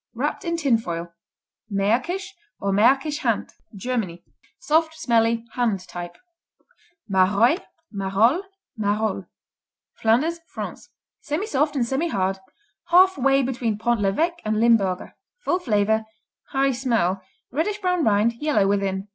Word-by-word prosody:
Wrapped - - -2
in 335 -2 -1
tin 275 -8 +2
foil. 170 -4 -5 0.6
Märkisch, 250 - 0 0.3
or 200 - -1
Märkisch 270 +9 +3
Hand - - -1 0.2
Germany 195 -6 -3 0.3
Soft; 320 +1 +1
smelly; 230 -4 +1
hand 225 -7 -1
type. 175 -1 -7 0.9
Maroilles, 200 - +3 0.3
Marolles, 210 - +2 0.3
Marole 210 -2 -1 0.7
Flanders, 280 +10 +1
France - - -7 0.3
Semisoft 300 -2 0
and 250 -4 +1
semihard, 215 - -1 0.5
half 370 +2 +6
way 275 +1 +3
between 240 -4 -1
Pont 235 0 0
l'Evêque 320 - +1
and 215 0 0
Limburger. 210 -6 +2 0.3
Full 355 - +1
flavor, 220 - +1 0.5
high 270 0 +2
smell, 230 -8 0 0.3
reddish 335 - -1
brown 360 -4 +1
rind, 215 +1 +3
yellow 295 -10 +2
within. 195 0 0
230 Hz, 115 wpm, -23 LUFS, 200-295 Hz, 0.9 s, half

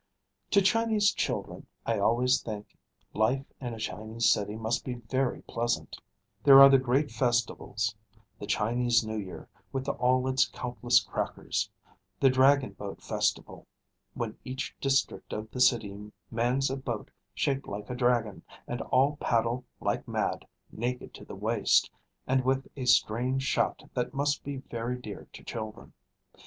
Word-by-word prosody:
To 200 - +4
Chinese 220 0 +3
children - - -3 0.2
I - - 0
always 125 +3 +3
think 105 -2 -7 0.4
life 125 +6 +1 0.2
in 120 -3 -4
a - - -9
Chinese 110 +2 -2
city 105 +1 +2
must 110 +1 -1
be 125 - -4
very 125 +2 -2
pleasant. 120 +1 -2 0.4
There 135 -1 +9
are 135 0 +11
the 135 -1 +6
great 130 +3 +1
festivals: 115 -2 0 0.5
the 100 - -7
Chinese 120 +3 +2
New 110 0 -3
Year, 95 -3 -8 0.2
with 135 0 -3
all 130 -1 +2
its 130 0 +3
countless 120 -1 +1
crackers; - - -2 0.5
the 135 - +5
Dragon 135 +1 +4
Boat 100 -1 -8
Festival, - - -2 0.5
when - - -3
each 130 +2 -5
district 135 0 0
of 110 +1 -5
the 125 - -3
city 105 -4 +2 0.2
mans 125 +4 +1
a 135 - -2
boat 120 -5 -5 0.2
shaped 135 -1 0
like 105 +3 -6
a - - -3
dragon, 120 -4 +1 0.3
and 120 - -3
all 140 +3 +2
paddle 120 +1 0
like - - -2
mad, - - -2 0.2
naked 125 +2 -4
to - - -11
the - - -9
waist, - - +2 0.3
and 130 0 +2
with 130 +1 0
a 130 -3 -4
strange 125 +2 +2
shout - - 0
that 125 +2 -2
must 145 +1 0
be 140 -1 -4
very 120 -1 -4
dear 110 -5 -9
to - - -12
children. 110 -2 -7
125 Hz, 150 wpm, -29 LUFS, 115-135 Hz, 0.5 s, are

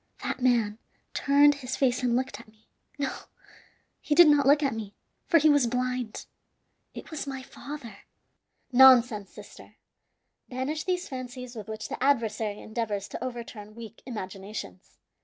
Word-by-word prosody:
That - - -3
man 230 -4 +2 0.3
turned 285 +1 +5
his 260 +1 -3
face 255 -2 +2
and 245 -2 +1
looked 250 -4 -2
at 235 - -14
me 215 0 -25 0.3
no, 280 -2 -2 0.9
he 295 - 0
did 345 0 +9
not 290 -2 +4
look 290 +2 +5
at 275 - +1
me, 215 -3 -7 0.3
for 335 - +5
he 310 -1 +4
was 285 -5 +4
blind. 250 -1 -2 0.7
It - - -9
was 305 -2 -5
my 265 -1 -5
father!" 255 -6 -9 0.7
"Nonsense, 245 -5 +6
sister! - - -14 0.7
Banish 265 +5 -3
these 360 -1 -1
fancies 250 -1 -7
with 215 -3 -8
which 220 0 -5
the - - -5
adversary 225 -6 +1
endeavors 215 -3 -3
to - - -6
overturn 230 -4 -7
weak 230 -1 -11
imaginations. 195 - -7
250 Hz, 150 wpm, -27 LUFS, 220-275 Hz, 0.9 s, did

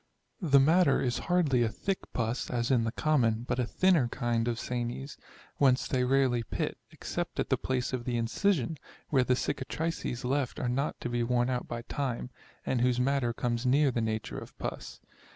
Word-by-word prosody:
The 140 -6 +5
matter 160 +2 +4
is 125 -1 0
hardly 155 -9 +3
a 115 - +2
thick 195 - -2
pus, 115 +1 -2
as 120 0 0
in 120 -3 +3
the 115 - -1
common, 120 -8 +1
but - - -1
a 125 - +1
thinner 175 -7 +3
kind 120 -1 -1
of 120 -1 0
sanies; 125 +3 -4 0.4
whence 130 -2 +3
they 130 -3 +1
rarely 130 -2 +2
pit, 115 - -3
except - - -5
at - - -1
the - - +4
place 130 -1 -2
of 125 -2 -2
the 120 -1 -1
incision, 150 - 0 0.3
where 135 -3 +3
the 125 0 +2
cicatrices 130 -1 -3
left 135 0 -1
are 125 - -1
not 135 +4 -1
to - - -3
be 120 0 -1
worn 120 +1 +1
out 125 -1 -2
by 120 0 -5
time, 130 -2 -3 0.3
and 125 - 0
whose 125 0 +2
matter 130 -1 +1
comes 120 0 -2
near 135 +2 +4
the 120 - -1
nature 110 -1 -2
of - - -12
pus. - - -6
125 Hz, 190 wpm, -30 LUFS, 120-140 Hz, 0.4 s, The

